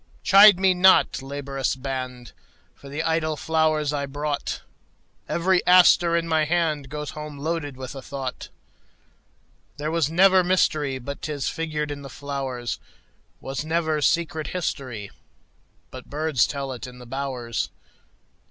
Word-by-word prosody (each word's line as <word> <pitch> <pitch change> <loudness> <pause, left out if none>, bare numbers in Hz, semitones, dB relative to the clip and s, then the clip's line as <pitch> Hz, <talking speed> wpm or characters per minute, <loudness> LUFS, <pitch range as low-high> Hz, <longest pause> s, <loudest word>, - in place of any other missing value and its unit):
Chide 200 -1 +8
me 190 -1 +4
not, 185 -5 +4
laborious 135 -1 -3
band, 130 -2 -5 0.4
For 140 - -14
the 150 +3 -3
idle 160 -1 0
flowers 155 -1 +1
I 140 -1 -2
brought; 145 +1 -3 0.7
Every 180 +1 +2
aster 175 -1 +6
in 165 0 -2
my 160 -1 +2
handGoes 150 -4 -1
home 150 -1 -8
loaded 145 -2 -3
with 130 -1 -7
a 135 - -8
thought. 135 -1 -6 1.3
There 150 +2 -3
was 165 -3 +1
never 185 +2 +5
mysteryBut 145 -7 0
'tis 145 -3 -2
figured 155 -2 -3
in 145 0 -6
the 135 - -9
flowers; 135 -3 -4 0.6
SWas 135 +1 -4
never 160 -1 0
secret 160 -1 0
historyBut 130 - -4 1.0
birds 150 -3 +1
tell 140 -2 -4
it 125 0 -7
in 125 0 -12
the 125 - -12
bowers. 125 -2 -3
150 Hz, 130 wpm, -24 LUFS, 135-165 Hz, 1.3 s, Chide